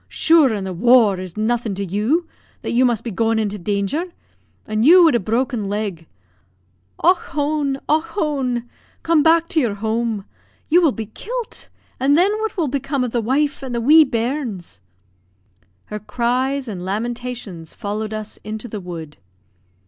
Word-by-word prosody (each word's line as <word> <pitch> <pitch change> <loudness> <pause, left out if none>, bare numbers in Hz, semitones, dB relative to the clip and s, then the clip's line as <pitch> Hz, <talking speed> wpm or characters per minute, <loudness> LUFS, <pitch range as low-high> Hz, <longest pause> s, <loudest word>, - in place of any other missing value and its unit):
Shure 320 -5 +4
an' 205 -3 -2
the 190 -1 -4
war 220 0 +4
is 185 0 -8
nothin' 225 -1 0
to 200 +1 -3
you, 215 - 0 0.4
that - - -3
you 250 +2 +3
must 235 -2 +1
be 235 - -4
goin' 225 +3 +1
into 210 -2 -1
danger; 200 - -1 0.6
an' 215 0 -1
you 345 +9 +8
wid 325 - +5
a 240 - +3
broken 230 0 -1
leg. 200 -6 -3 0.9
Och 360 +3 +5
hone! 290 -3 -2
Och 310 +1 +3
hone! 285 - -2 0.4
Come 330 -2 +3
back 330 +2 +4
to 340 -4 +2
your 235 -8 0
home 220 -1 -2 0.4
you 345 +3 +5
will 320 -5 +4
be 225 -3 -5
kilt, 475 - -7 0.3
and 275 +3 +3
thin 370 +4 +4
what 440 -1 -3
will 330 -4 +1
become 275 0 -1
of 245 - -2
the 235 - 0
wife 280 +6 0
and 260 -3 -5
the - - 0
wee 305 +7 +7
bairns?" 235 - -3 1.0
Her 210 - -6
cries 255 +5 -1
and 190 -5 -5
lamentations 220 -4 -5
followed 215 0 -4
us 215 0 -6
into 215 +2 -6
the 210 -2 -6
wood. 165 -4 -8
240 Hz, 165 wpm, -20 LUFS, 210-290 Hz, 1.0 s, you